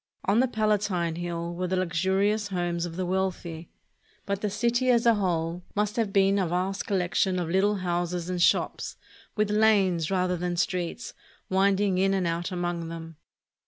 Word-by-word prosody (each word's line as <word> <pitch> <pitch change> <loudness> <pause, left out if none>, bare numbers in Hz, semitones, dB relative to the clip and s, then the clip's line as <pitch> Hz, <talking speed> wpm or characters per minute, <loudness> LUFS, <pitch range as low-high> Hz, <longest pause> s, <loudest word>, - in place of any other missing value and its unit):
On 200 +4 +3
the 260 - +4
Palatine 205 -7 0
Hill 170 -1 -4
were 180 +1 -2
the 185 - 0
luxurious 190 +4 +1
homes 175 -2 -2
of 165 - -8
the 185 +1 -2
wealthy; 180 -3 -3 0.6
but 200 0 -2
the 210 - 0
city 240 +5 +1
as 235 -2 +4
a 235 - +6
whole 175 -4 -1
must 210 +1 0
have 225 -5 0
been 195 0 +3
a 185 - +1
vast 185 +3 -2
collection 185 0 +1
of 175 -2 -2
Httle 195 +2 +2
houses 175 -1 -2
and 180 -1 -2
shops, - - +1 0.4
with 210 -1 +1
lanes, 200 -6 +3
rather 180 -1 +1
than 175 0 -2
streets, 175 0 -2 0.4
winding 195 0 +2
in 195 +1 +3
and 190 -2 0
out 170 +1 -2
among 175 -2 -3
them. 165 -1 -8
185 Hz, 170 wpm, -27 LUFS, 175-200 Hz, 0.6 s, a